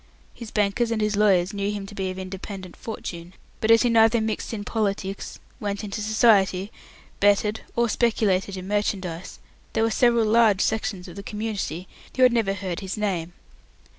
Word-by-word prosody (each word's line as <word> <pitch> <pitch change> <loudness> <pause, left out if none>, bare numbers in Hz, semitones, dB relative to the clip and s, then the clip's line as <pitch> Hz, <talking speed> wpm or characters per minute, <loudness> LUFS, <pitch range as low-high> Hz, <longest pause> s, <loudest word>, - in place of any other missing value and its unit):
His 235 -3 -9
bankers 210 +3 +1
and 230 -1 -1
his 210 -1 +1
lawyers 195 -2 +3
knew 200 0 -1
him 205 -1 -5
to 195 - -11
be 190 -2 -2
of 185 - -6
independent 190 0 -7
fortune, 175 -5 -7 0.3
but 220 - -1
as 230 +1 +7
he 245 - +3
neither 225 0 +5
mixed 220 0 -2
in 215 -3 -4
politics, 200 -2 -3 0.2
"went 205 0 -3
into 210 +1 -4
society", 210 -3 +3 0.5
betted, 205 +1 +3
or 235 0 +3
speculated 200 -5 +1
in 185 0 -7
merchandise, 190 -4 -2 0.4
there 225 - +2
were 225 - +2
several 235 -1 +3
large 215 -3 +4
sections 205 -4 -1
of 175 - -11
the - - -5
community 205 -5 -4 0.3
who 260 - +4
had 250 -1 +6
never 210 -4 +1
heard 185 -3 -4
his 190 +1 -5
name. 180 -5 -2
205 Hz, 175 wpm, -24 LUFS, 190-220 Hz, 0.5 s, as